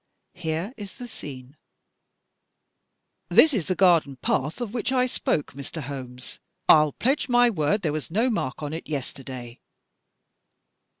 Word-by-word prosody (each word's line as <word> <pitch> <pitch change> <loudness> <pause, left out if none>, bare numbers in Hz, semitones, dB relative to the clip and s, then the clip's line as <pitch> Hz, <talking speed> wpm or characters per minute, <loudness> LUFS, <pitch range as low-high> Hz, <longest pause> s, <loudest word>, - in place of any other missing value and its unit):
Here 175 +4 -3
is 205 -3 -9
the 245 - -7
scene: 135 - -9 1.1
" - - -52
This 310 -1 +7
is 195 -10 -1
the 185 - +1
garden 170 -7 +4
path 135 - -1
of 235 -3 -4
which 245 +1 -1
I 255 -1 +3
spoke, 160 - -1
Mr. 140 +4 -6
Holmes. 130 -2 -7 0.3
1*11 150 -2 +6
pledge 270 +3 +1
my 245 0 +5
word 180 +3 +1
there 155 -3 0
was 150 -5 -4
no 225 +9 +2
mark 145 - -2
on 145 +1 -3
it 160 - -6
yesterday." 130 -4 -6
160 Hz, 145 wpm, -25 LUFS, 140-220 Hz, 1.1 s, This